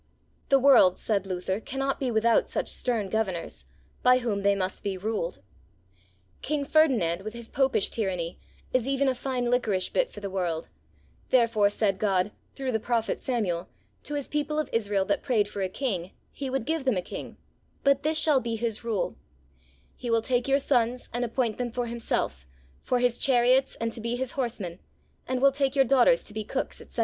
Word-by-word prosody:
The 275 - +6
world, 260 -9 +6
said 200 -3 -1
Luther, 185 +1 -2
cannot 270 +3 -2
be 265 - -1
without 230 0 +3
such - - -2
stern 230 -5 0
Governors, 190 -4 -3 0.4
by 250 0 +6
whom 230 -5 -1
they 200 0 +3
must 185 -1 -3
be 195 -2 -3
ruled. 185 - -3 1.0
King 290 0 -1
Ferdinand, 240 - +3
with 215 +3 -7
his 235 -1 -8
Popish 265 -6 +2
tyranny, 180 -6 -3 0.3
is 255 -1 +1
even 275 0 +1
a 265 - +3
fine 250 -1 -2
liquorish 210 -7 +1
bit - - +1
for - - -9
the 200 - -4
world; 175 -4 -2 0.6
therefore 230 -5 +4
said 200 -2 0
God, 195 -1 +1 0.2
through 265 -2 -2
the 220 - 0
Prophet 230 0 -1
Samuel, 190 -9 -2 0.3
to 295 - -5
his 285 -2 -3
people 300 0 -2
of 310 - -1
Israel 205 -4 +1
that 200 - 0
prayed 215 -5 +1
for 205 -1 -5
a 190 - 0
King, 190 -6 -3 0.2
He 275 -2 -5
would 265 -3 -2
give 320 0 -1
them 260 -7 +1
a 180 - -1
King, - - -8 0.5
but 280 0 +4
this 310 +2 +1
shall 305 -3 +4
be 230 -2 -3
his 225 -1 -2
rule: 225 -5 -2 0.8
"He 245 - -6
will 230 -1 +2
take 245 +1 0
your 275 0 +4
sons, 250 -3 0
and 240 +1 -1
appoint 235 -1 -1
them 245 -1 -1
for 245 +1 -2
himself, 230 - -2 0.3
for 250 - 0
his 245 -1 +1
chariots, 260 0 +3
and 230 0 -1
to 230 - -3
be 235 +2 -1
his 260 0 -2
horsemen, 225 -10 -3 0.5
and 255 0 -1
will 275 - +7
take 275 0 0
your 270 -1 +5
daughters 275 - +4
to 210 - -7
be 215 0 -3
cooks," - - -4
etc. - - -9
235 Hz, 195 wpm, -27 LUFS, 200-265 Hz, 1.0 s, will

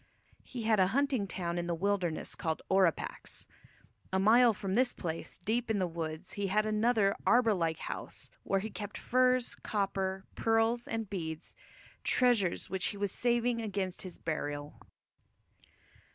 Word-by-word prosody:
He 245 -3 -7
had 220 -2 +3
a 185 - +5
hunting 275 -8 +1
town 175 -2 -2
in 175 - -3
the 170 - 0
wilderness 185 -2 -1
called 160 -1 -3
Orapax. 190 -5 +1 0.7
A 190 - +2
mile 230 +5 +6
from 195 -2 -3
this 250 +3 +3
place, 165 -2 -5
deep 230 +5 -1
in 220 - +2
the 185 - +1
woods, 165 0 -5
he 200 -1 -1
had 210 +3 +2
another 215 -1 +2
arbour 235 -2 +5
like 165 -4 0
house, - - -6
where 195 -1 0
he 220 +2 -5
kept 205 -1 -6
furs, 255 0 +2
copper, 195 -2 -2
pearls, 225 +1 +2
and 225 -1 -2
beads, 160 -5 -5 0.5
treasures 240 -8 +2
which 190 -1 -2
he 205 - -3
was 200 -1 -1
saving 240 -1 +1
against 195 -4 -2
his 185 -2 -7
burial. 145 -2 -4
200 Hz, 150 wpm, -32 LUFS, 180-230 Hz, 0.7 s, mile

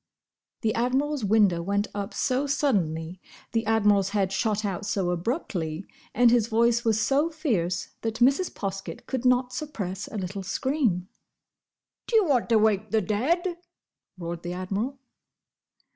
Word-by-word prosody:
The 220 -2 +1
Admiral's 265 +3 0
window 200 -4 +3
went 200 +3 0
up 205 +1 -4
so 265 +2 0
suddenly, 185 - 0 0.3
the 225 -1 -1
Admiral's 205 -3 +3
head 200 -2 0
shot 215 +1 0
out 195 0 -3
so 190 -3 0
abruptly, 175 - -3 0.3
and 240 0 +6
his 235 -3 +3
voice 235 +1 +2
was 220 -2 +2
so 280 +8 +2
fierce, 210 - -1
that 225 -1 -2
Mrs. 270 +10 +3
Poskett 195 -1 -5
could 260 -2 -3
not 250 0 +3
suppress 200 - -4
a 220 - -6
little 195 +1 -4
scream. 200 - 0 1.0
"D'ye 450 - +4
want 270 -10 +1
to 230 - +5
wake 215 -1 +2
the 220 0 +2
dead?" 335 - 0 0.6
roared 170 -1 -5
the 175 0 -4
Admiral. 200 +9 -3
215 Hz, 145 wpm, -26 LUFS, 190-250 Hz, 1.0 s, and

